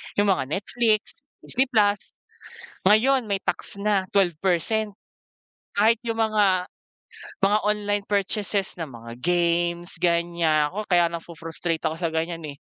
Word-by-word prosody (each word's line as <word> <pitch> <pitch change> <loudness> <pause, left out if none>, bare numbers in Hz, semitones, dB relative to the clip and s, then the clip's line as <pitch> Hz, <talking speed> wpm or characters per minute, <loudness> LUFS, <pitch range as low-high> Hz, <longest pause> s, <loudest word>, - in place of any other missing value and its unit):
yung 205 -1 +3
mga 135 -8 0
Netflix, 215 - 0 0.3
Disney 265 +2 +1
Plus, 205 -5 +1 0.7
ngayon 240 +5 +4
may 200 -2 -2
tax - - -3
na 200 -2 +1
12% 195 +3 +1 0.8
Kahit 220 +3 +4
yung 225 -1 -1
mga 205 -4 +2 0.8
mga 205 +2 +4
online 205 -1 0
purchases 200 -1 -1
na 160 - -3
mga 115 -2 -10
games 170 +1 0
ganyan 170 -3 +1
nako 210 +2 -5
kaya 175 -2 +4
nafo-frustrate 165 0 -4
ako 160 +1 -1
sa 170 - +1
ganyan 165 +1 -2
eh. 140 - -9
190 Hz, 125 wpm, -24 LUFS, 170-210 Hz, 0.8 s, ngayon